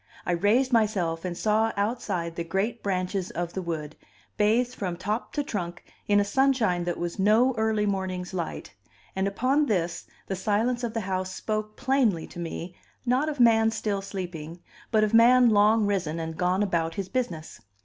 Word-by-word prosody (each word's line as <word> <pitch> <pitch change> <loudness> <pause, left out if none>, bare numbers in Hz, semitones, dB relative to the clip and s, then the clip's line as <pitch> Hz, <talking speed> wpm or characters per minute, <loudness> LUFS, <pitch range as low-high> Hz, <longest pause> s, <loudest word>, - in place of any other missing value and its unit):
I - - 0
raised 215 +9 +2
myself 190 -8 +1
and 175 -1 -3
saw 220 +1 +2
outside 190 -6 -2
the 170 - -3
great 195 +7 -2
branches 185 -1 -2
of 175 0 -4
the 190 - -3
wood, 155 -3 -4 0.4
bathed 230 +4 +2
from 180 -7 -4
top 210 +6 -3
to 290 - 0
trunk 180 -8 -5 0.2
in 205 0 +4
a - - +3
sunshine 215 -6 +2
that 175 -1 -2
was 175 +2 -4
no 220 +6 +4
early 220 -1 +1
morning's 190 -2 -3
light; 170 -3 -5 0.4
and 190 +1 0
upon 260 +9 +1
this, 175 -5 -1 0.2
the 195 - -3
silence 220 +6 0
of 230 -1 -3
the 225 - 0
house 185 -1 -2
spoke 215 0 -3
plainly 245 -11 +1
to 175 - -11
me 170 +1 -5 0.3
not 260 +5 +2
of 295 -3 -5
man 225 -2 +5
still 210 -3 -2
sleeping, 175 -4 -6 0.3
but 215 -1 +3
of 215 +1 0
man 240 +1 +6
long 210 +1 +4
risen 180 -6 -1
and 160 0 -4
gone 180 +4 +1
about 165 -4 -1
his 195 -2 -3
business. 185 - -4
200 Hz, 180 wpm, -26 LUFS, 175-225 Hz, 0.4 s, man